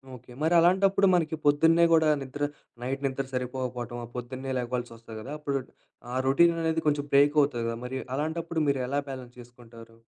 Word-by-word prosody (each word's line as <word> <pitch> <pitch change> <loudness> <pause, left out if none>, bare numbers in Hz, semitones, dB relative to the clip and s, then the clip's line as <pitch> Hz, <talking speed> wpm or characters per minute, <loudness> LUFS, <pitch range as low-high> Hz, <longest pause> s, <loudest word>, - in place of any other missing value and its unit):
Okay. 125 0 -15
మరి 160 +2 +2
అలాంటప్పుడు 195 +3 +4
మనకి 165 -3 +1
పొద్దున్నే 160 +4 +5
గూడా 160 -1 +5
నిద్ర 135 +2 -5 0.4
నైట్ 135 +3 -3
నిద్ర 135 0 -2
సరిపోకపోవటమో, 125 -1 -4
పొద్దున్నే 130 +2 -5
లేగవాల్సొస్తది 120 -2 -5
గదా! 135 +6 -7
అప్పుడు 140 -2 -1 0.5
ఆ - - -2
రొటీననేది 165 +2 +3
కొంచెం 145 -1 +1
బ్రేకవుతది 145 -3 +4
గదా! 115 0 -3
మరి 130 +1 -4 0.2
అలాంటప్పుడు 160 +2 -2
మీరు 140 -2 +1
ఎలా 140 +2 0
బాలన్స్ 125 -2 -8
చేసుకుంటారు? 115 -1 -14
135 Hz, 150 wpm, -27 LUFS, 125-160 Hz, 0.5 s, పొద్దున్నే